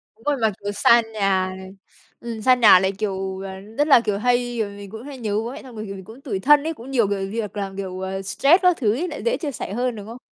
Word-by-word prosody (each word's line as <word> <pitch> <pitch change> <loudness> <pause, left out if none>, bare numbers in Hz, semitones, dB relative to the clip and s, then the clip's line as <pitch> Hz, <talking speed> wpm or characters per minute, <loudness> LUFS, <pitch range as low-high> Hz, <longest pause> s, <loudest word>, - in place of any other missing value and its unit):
Đúng 225 - -24
rồi, 290 -1 +1
mà, 220 -1 +3
kiểu, 205 - -2
xa 235 +3 +5
nhà 190 -3 0
này, 190 0 -10 0.5
ừm, 230 -2 -6
xa 255 +3 +5
nhà 215 -6 +7
lại, 190 +1 +1
kiểu, 190 -1 -4
ờ, 190 -1 -7
rất 225 +10 -2
là, 275 - +7
kiểu, 210 -3 -1
hay 245 +1 0
rồi 210 -2 -1
mình 200 -1 -10
cũng 220 +3 -9
hay 280 -2 -9
nhớ 215 -4 -3
bố 230 +2 -4
mẹ 285 - -9
xong 255 -3 -12
rồi, 215 0 -6
kiểu, 195 - -7
mình 190 -1 -10
cũng 230 +5 -13
tủi 215 -9 -3
thân 290 +7 +5
ấy, 320 +1 -2
cũng 260 -2 -11
nhiều 235 -6 +2
gợi 195 -1 -2
việc 210 -1 -5
làm, 195 -1 -4
kiểu, 185 -2 -5
ờ, 190 +1 -4
stress 275 - +3
các 360 -2 +4
thứ 215 -6 +1
ấy 315 +10 -2
lại - - -7
dễ 480 - +1
chia 300 -4 -4
sẻ 220 - -6
hơn, 245 +1 -1
đúng 205 -1 -9
không? 230 +2 -8
220 Hz, 290 wpm, -22 LUFS, 195-250 Hz, 0.5 s, nhà